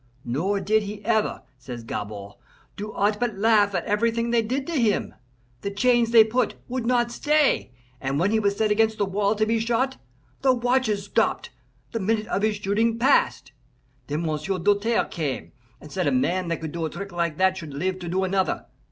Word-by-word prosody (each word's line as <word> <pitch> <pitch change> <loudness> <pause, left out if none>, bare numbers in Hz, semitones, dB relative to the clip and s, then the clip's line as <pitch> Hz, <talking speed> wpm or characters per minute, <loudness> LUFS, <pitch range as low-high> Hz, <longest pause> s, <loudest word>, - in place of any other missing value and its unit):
Nor 175 +12 0
did 215 +3 +2
he 205 0 -7
ever, 220 -1 +1 0.2
says 120 -2 -8
Gabord, 100 -2 -6 0.4
do 210 +1 -6
aught 210 +1 0
but 240 -4 -1
laugh 205 -1 +3
at 175 - -1
everything 230 +2 0
they 235 -1 +3
did 260 +5 -2
to 340 - -5
him. 215 -3 +1 0.5
The 200 - -2
chains 240 +3 +2
they 230 -1 +8
put 230 +1 0
would 250 -2 -3
not 240 -1 +2
stay, 300 - +2 0.3
and 135 +1 -1
when 190 +5 +2
he 220 - +3
was 200 -1 0
set 215 -1 +1
against 220 +1 +2
the 205 - +1
wall 200 +2 0
to 215 +1 +1
be 225 +1 +1
shot, 240 +4 0 0.4
the 260 -1 +4
watches 245 -4 +1
stopped - - 0 0.4
the 230 - -2
minute 215 +2 0
of 195 - 0
his 215 0 +1
shooting 210 +3 0
passed. 260 - +2 0.6
Then 150 +3 -2
M'sieu' 160 +4 -2
Doltaire 205 +5 +2
came, 150 -6 -4 0.3
and 150 - -13
said 185 -2 -1
a - - +3
man 185 -8 +1
that 165 -1 -2
could 160 -2 -4
do 170 +1 -4
a - - -2
trick 200 +5 -7
like 170 -3 -1
that 190 0 +3
should 155 -6 -7
live 185 +5 -2
to 175 -2 -6
do 190 +2 0
another. 190 0 0
205 Hz, 200 wpm, -24 LUFS, 185-230 Hz, 0.6 s, they